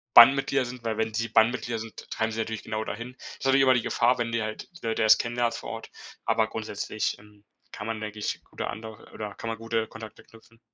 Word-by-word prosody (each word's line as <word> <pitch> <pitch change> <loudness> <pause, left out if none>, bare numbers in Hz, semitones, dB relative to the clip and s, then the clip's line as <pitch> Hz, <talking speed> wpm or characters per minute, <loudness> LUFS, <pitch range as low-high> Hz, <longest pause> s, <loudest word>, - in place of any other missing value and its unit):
Bandenmitglieder 135 +2 +8
sind 125 0 -8
weil 110 -2 -1
wenn 110 0 0
sie 115 +1 -1
Bandmitglieder 115 +1 +3
sind, 110 0 -9
treiben 110 0 0
sie 110 - -4
natürlich 110 -1 -3
genau 110 0 -2
dahin. 120 +4 -6
Ist - - -9
natürlich 135 0 +5
immer 130 -1 +6
die 125 - +2
Gefahr, 125 +2 +3
wenn 120 -1 -1
du 115 - +1
halt 110 0 -5
die - - -8
Leute 115 0 0
erst 110 - +7
kennenlernst 120 0 0
vor - - -7
Ort. - - -6 0.4
Aber 110 0 +3
grundsätzlich, 110 -1 -3
ähm, 105 0 -19 0.3
kann 105 - -6
man, 110 -1 -3
denke 105 0 -5
ich, 105 - -3
gut - - -18
da - - 0
ander 110 0 -8
oder 105 -2 -5
kann 115 - -6
man 115 - -3
gute 115 0 -1
Kontakte 110 0 -10
knüpfen. 115 0 -19
115 Hz, 235 wpm, -27 LUFS, 110-120 Hz, 0.4 s, Bandenmitglieder